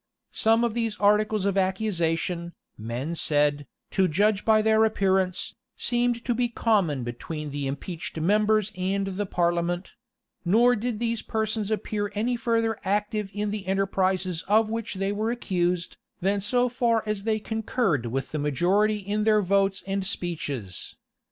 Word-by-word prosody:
Some 225 +1 +3
of 235 -2 +1
these 225 -2 -1
articles 210 0 +3
of 200 -1 +2
accusation, 175 -3 -1 0.2
men 120 +9 -4
said, 145 -3 +1 0.2
to 190 -1 +3
judge 200 +5 +2
by 220 -1 +5
appearance, 200 -4 +2 0.2
seem 240 0 +1
to 240 +1 -2
be 240 +1 0
common 195 - +1
between 150 +5 -5
the 140 -1 -3
impeached 160 +4 -5
members 210 +4 +2
and 195 +2 -1
the 195 +1 -3
parliament; 175 0 0 0.5
nor 235 +7 +4
did 230 0 -2
these 230 0 -1
persons 220 -1 -2
appear 210 -1 -2
any 235 +4 0
further 230 -2 0
active 205 +1 -1
in 205 +1 -2
the 205 -2 -5
enterprises 190 -2 0
of 215 +2 +3
which 230 -2 -3
they 195 +1 -1
were 215 +2 -1
accused, 180 -7 -1 0.2
than 195 +2 +1
so 245 +5 +2
far 235 -2 +1
as 210 -2 -2
they 215 +1 0
concurred 220 - -1
with 135 +3 -3
the 155 - -2
majority 180 +9 +2
in 205 +1 -2
their 215 -1 +4
votes 195 +1 +1
and 195 0 -1
speeches. 145 - -4
200 Hz, 150 wpm, -26 LUFS, 175-220 Hz, 0.5 s, by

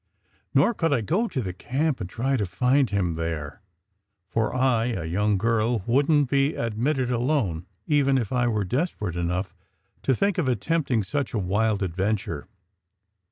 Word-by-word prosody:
Nor 240 - +5
could 165 -6 0
I 135 -5 +2
go 190 - 0
to 130 - -2
the 95 -5 -4
camp 135 - -1
and 90 - -4
try 130 +7 0
to 105 -6 -1
find 125 +7 +2
him 95 -4 0
there, 80 -1 -4 0.7
for 110 +2 0
I 125 -3 +2
a 95 -9 -2
young 100 +5 +1
girl 115 +1 +1
wouldn 145 +4 +3
t 125 - -16 0.2
be - - -6
admitted 125 +3 -1
alone 120 - 0 0.2
even 140 -3 +3
if 120 -2 -2
I 125 -1 +2
were 110 -3 0
desperate 115 - -2
enough 90 +2 -2 0.5
to 135 - +2
think 200 - +1
of 155 - 0
attempting 130 -3 0
such 120 +6 -2
a - - +1
wild 105 +2 +1
adventure. 95 -3 -2
115 Hz, 165 wpm, -25 LUFS, 95-135 Hz, 0.7 s, Nor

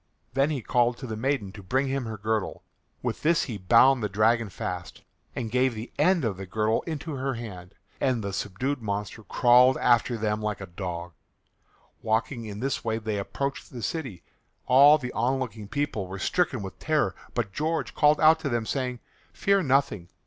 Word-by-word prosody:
Then 135 +2 +2
he 140 -6 -3
called 120 0 +2
to 135 - -7
the 110 -3 -4
maiden 115 -4 -1
to 105 +1 -11
bring 130 +9 0
him 135 -1 -2
her 110 -1 -5
girdle. 110 0 -2 0.4
With - - -3
this 165 +1 +3
he 110 -6 -5
bound 120 +7 +5
the 105 - -1
dragon 110 +2 +2
fast, - - -6 0.3
and 115 -3 -4
gave 125 -1 +2
the 110 +3 -7
end 170 -1 +3
of 100 -5 -1
the 95 0 -7
girdle 110 +3 +1
into 155 -2 -4
her 135 -1 -2
hand, 100 -6 -9 0.2
and 125 -5 0
the 100 0 -4
subdued 125 +9 -2
monster 105 0 -4
crawled 125 +4 +5
after 120 0 +3
them 105 -1 -1
like 105 -1 -2
a 95 - -6
dog. 85 -1 -6 0.9
Walking 115 +2 -1
in 105 0 -7
this 135 0 -2
way 110 -1 -1
they 110 -2 -3
approached 140 +7 -4
the 120 -3 -7
city. 130 - -4 0.4
All 140 +4 +7
the 125 -4 -6
onlooking 120 -4 -2
people 145 -6 -2
were 95 +1 -6
stricken 130 - 0
with 95 - -8
terror, 155 -1 +1 0.2
but 110 -5 -2
George 160 +2 -2
called 150 0 +4
out 160 +1 +6
to 150 - -3
them 120 -3 -1
saying, 125 -1 -3 0.3
"Fear 200 0 +2
nothing. 135 - +1
120 Hz, 185 wpm, -26 LUFS, 105-135 Hz, 0.9 s, All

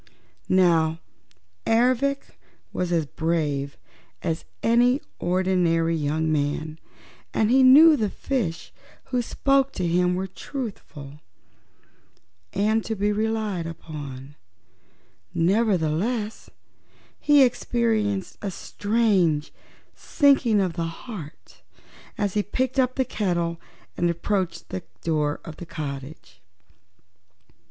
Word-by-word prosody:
Now 165 -3 +3 0.7
Ervic 255 +4 +1 0.4
was 180 -1 -2
as 165 -3 +1
brave 145 -3 -2 0.5
as 165 -2 -2 0.2
any 245 +3 +4 0.2
ordinary 175 -2 +1
young 155 +1 0
man, 155 +1 -2 0.6
and 220 +1 +2
he 265 +1 +5
knew 300 +5 +8
the 215 -6 0
fishes 195 -9 -3 0.4
who 250 -1 +1
spoke 275 +3 +1
to 180 - -2
him 180 +1 +2
were 190 +1 -2
truthful 185 - -8 1.3
and 215 +2 +1
to 220 - -3
be 205 +1 0
relied 215 -5 -1
upon, 145 -4 -8 1.0
nevertheless 205 +3 0 0.7
he 290 -2 +6
experienced 220 -5 0
a 205 - -2
strange 195 -7 0 0.4
sinking 270 -8 +3
of 185 -3 0
the 170 -1 -2 0.2
heart 180 - -10 0.6
as 205 -3 -1
he 210 - +2
picked 260 +5 -1
up 255 -1 +2
the 260 - +1
kettle 170 -6 -1 0.3
and 175 - +1
approached 185 +2 -2
the 95 - -4 0.2
door 150 -3 0
of 160 -2 -9
the 175 - -8
cottage. 140 -1 -7
185 Hz, 105 wpm, -24 LUFS, 160-230 Hz, 1.3 s, knew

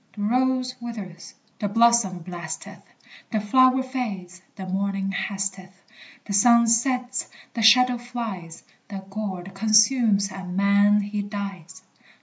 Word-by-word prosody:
The 205 - -5
rose 255 +3 0
withers, 210 -7 -8 0.2
the 205 - -2
blossom 225 -5 +3
blasteth, 175 -2 -8 0.5
The 220 - 0
flower 255 +5 +3
fades, 200 -9 -6
the 190 - -7
morning 195 +1 -2
hasteth, 195 -1 -4 0.5
The 200 - -5
sun 235 +3 +5
sets, 250 +2 0 0.2
the 230 - -3
shadow 250 +2 +5
flies, 225 -9 -7 0.2
The 195 -1 -7
gourd 195 -3 -5
consumes, 215 0 +3
and 185 -1 -7
man 200 +1 +4
he 205 0 -3
dies! 195 -3 -7
205 Hz, 125 wpm, -24 LUFS, 195-235 Hz, 0.5 s, sun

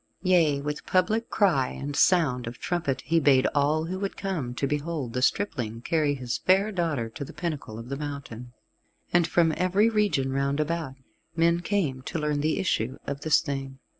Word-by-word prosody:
Yea, 165 -6 +3
with 150 +1 -4
public 215 +5 +1
cry 175 -11 +2
and 145 +1 -5
sound 140 -11 +3
of 120 +1 -6
trumpet 150 -7 -2
he 165 +2 +2
bade 140 -4 +4
all 150 +2 +2
who 185 +3 -4
would, 195 0 -4
come 160 -11 -3
to 140 - -1
behold 145 -3 -3
the 125 - -1
stripling 125 - 0
carry 150 +3 +1
his 125 -3 -3
fair 195 +3 +3
daughter 165 - -1
to 130 +6 -7
the - - -9
pinnacle 150 -8 -5
of 115 +2 -9
the 140 - -2
mountain. 135 -5 -7 0.6
And 175 -1 +4
from 165 -1 +3
every 190 +5 +3
region 180 -12 +1
round 140 +1 0
about 155 -3 -2 0.4
men 170 +1 +3
came 175 -9 -1
to 130 - -5
learn 150 -2 0
the 155 +1 +1
issue 130 - -1
of 140 0 -4
this 155 - +3
thing. 135 -3 -5
150 Hz, 185 wpm, -26 LUFS, 135-175 Hz, 0.6 s, bade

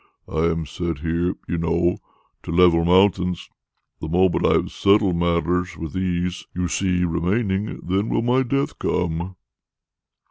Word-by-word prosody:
I 80 +1 0
am 80 -1 0
set 85 +1 -4
here, 85 +3 -1
you 85 - -2
know, 85 +1 +1 0.4
to - - -7
level 85 -1 +4
mountains. 90 0 +2 0.5
The 80 - -5
moment 90 +2 +2
I - - +4
have - - 0
settled 100 -2 +3
matters 85 +1 0
with 80 -2 -6
these 90 -1 -2
you 90 0 -1
see 90 -2 0
remaining, 95 +5 -1
then 95 +5 -1
will - - 0
my 125 +2 +2
death 140 +3 -2
come!" 85 +1 -2
90 Hz, 145 wpm, -22 LUFS, 85-95 Hz, 0.5 s, level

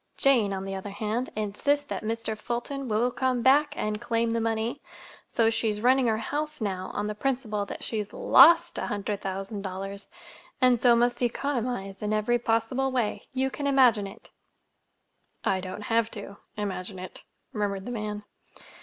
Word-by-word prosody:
Jane, 245 -8 +4
on 190 0 -3
the 195 - -4
other 195 +1 -5
hand, 215 +5 -2
insists 215 +8 0
that - - -4
Mr. 225 0 -2
Fulton 240 +5 -4
will 230 +3 +1
come 255 -2 0
back 290 +3 +4
and 210 0 -2
claim 230 0 0
the 230 - 0
money, 225 +4 -1 0.5
so 225 -1 +2
she's 220 -2 0
running 255 +2 +4
her 220 -1 +2
house 300 +6 -3
now 190 -4 -3
on 205 - -1
the 210 - -2
principle 215 -3 -2
that - - -7
she's 210 -3 -3
lost 335 +5 +6
a - - -2
hundred 205 0 -3
thousand 195 +2 -4
dollars, 195 +1 -6 0.5
and 250 -2 +4
so 240 0 +6
must 240 +1 +1
economize 245 -5 -2
in 210 0 -1
every 215 +3 +2
possible 235 +4 0
way. 245 -5 -1
You 265 0 0
can 285 +1 -3
imagine 250 -7 +4
it!" 195 - -14 1.1
"I 190 -1 +1
don't 185 +3 -6
have 225 +1 +1
to—imagine 200 -2 -6
it," 185 0 -9 0.3
murmured 200 -2 -2
the 245 - -5
man. 210 -2 -4
225 Hz, 165 wpm, -27 LUFS, 205-250 Hz, 1.1 s, lost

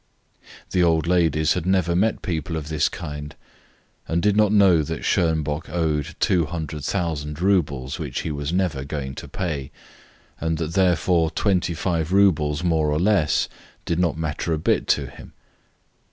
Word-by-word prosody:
The 90 - +2
old 80 -2 +3
ladies 80 -3 +2
had 85 - -3
never 95 -2 +2
met 105 +5 +1
people 80 -1 -3
of 75 -1 -6
this 75 -2 +1
kind, 75 -4 -7 0.7
and 85 - 0
did 105 +3 +2
not 105 -1 +4
know 95 -6 +5
that 80 +1 -4
Schonbock 80 -2 0
owed 80 -2 -1
200,000 80 -3 -1
roubles 80 -7 0
which 75 -6 -3
he 80 - -3
was 75 +1 -3
never 90 -7 0
going 70 -1 -5
to - - -8
pay, 75 -8 -4 0.7
and 80 0 -1
that 80 0 -3
therefore 90 -3 +2
25 85 -2 0
roubles 80 -6 +3
more 80 -3 +2
or 75 - +1
less 95 -5 +2 0.4
did 85 0 -1
not 85 -3 +1
matter 80 +1 -2
a - - 0
bit 75 - 0
to - - +2
him. - - -12
80 Hz, 155 wpm, -23 LUFS, 75-90 Hz, 0.7 s, know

